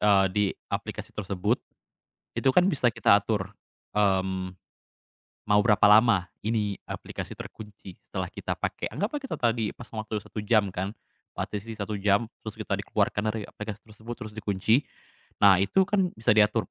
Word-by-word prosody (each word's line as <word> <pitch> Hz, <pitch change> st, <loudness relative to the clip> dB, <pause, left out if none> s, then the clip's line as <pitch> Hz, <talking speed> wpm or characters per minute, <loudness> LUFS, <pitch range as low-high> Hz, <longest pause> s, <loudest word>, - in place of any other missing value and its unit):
eee, 100 Hz, -2 st, +5 dB
di 105 Hz, +1 st, +2 dB, 0.3 s
aplikasi -, -, -4 dB
tersebut, 105 Hz, +3 st, -1 dB, 0.7 s
itu 135 Hz, -, +3 dB
kan 180 Hz, +7 st, +4 dB
bisa 135 Hz, -9 st, +3 dB
kita 115 Hz, -3 st, +4 dB
atur, 100 Hz, -2 st, -2 dB, 0.4 s
mmm, 95 Hz, -2 st, +1 dB, 1.0 s
mau 105 Hz, 0 st, +6 dB
berapa 105 Hz, -4 st, +3 dB
lama 105 Hz, -4 st, +5 dB, 0.2 s
ini, 105 Hz, -3 st, 0 dB
aplikasi -, -, -6 dB
terkunci 105 Hz, -4 st, -10 dB
setelah -, -, -5 dB
kita -, -, -4 dB
pakai. -, -, -3 dB
Anggaplah 205 Hz, -, -1 dB
kita 270 Hz, -2 st, -5 dB
tadi 115 Hz, -3 st, 0 dB
pasang 115 Hz, -2 st, -9 dB
waktu 105 Hz, -2 st, -3 dB
1 -, -, -9 dB
jam 105 Hz, -1 st, +2 dB
kan, 95 Hz, +3 st, -4 dB, 0.4 s
partisi 105 Hz, +2 st, -4 dB
1 105 Hz, 0 st, -4 dB
jam, 100 Hz, +3 st, +2 dB, 0.2 s
terus -, -, -4 dB
kita -, -, -3 dB
dikeluarkan 110 Hz, +1 st, 0 dB
dari 110 Hz, -, -3 dB
aplikasi 105 Hz, +1 st, -7 dB
tersebut, 110 Hz, +2 st, -9 dB
terus 110 Hz, -2 st, -8 dB
dikunci. 110 Hz, +5 st, +1 dB, 0.6 s
Nah 100 Hz, -3 st, +8 dB
itu 100 Hz, -, +3 dB
kan 190 Hz, -2 st, +1 dB
bisa 110 Hz, -, +1 dB
diatur, 105 Hz, -1 st, +3 dB
105 Hz, 155 wpm, -27 LUFS, 100-115 Hz, 1.0 s, Nah